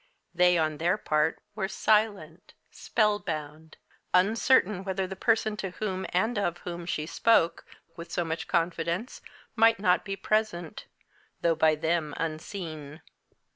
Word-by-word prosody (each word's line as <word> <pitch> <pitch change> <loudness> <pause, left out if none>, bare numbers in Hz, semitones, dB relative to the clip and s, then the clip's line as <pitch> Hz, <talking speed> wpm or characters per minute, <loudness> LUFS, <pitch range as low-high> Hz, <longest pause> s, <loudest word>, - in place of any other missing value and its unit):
They, 180 0 +4
on 155 -2 0
their 175 +5 +2
part, 155 -5 0
were 205 -2 -2
silent, 200 -5 0 0.2
spellbound, 160 -8 -2 0.4
uncertain 210 0 +3
whether 190 0 -2
the 190 +1 -6
person 220 +1 +1
to 195 - -3
whom 190 0 -4
and 215 +5 0
of 175 -4 -1
whom 175 -1 -6
she 155 -3 -2
spoke 170 0 +2 0.3
with 170 0 -9
so 175 - -1
much 160 0 -4
confidence 170 +4 -1 0.3
might 225 -1 +4
not 180 -3 +2
be 195 -1 -4
present, 195 -4 -2 0.5
though 170 - +3
by 160 -1 +3
them 160 -1 -1
unseen. 155 -2 -6
180 Hz, 135 wpm, -28 LUFS, 160-205 Hz, 0.5 s, They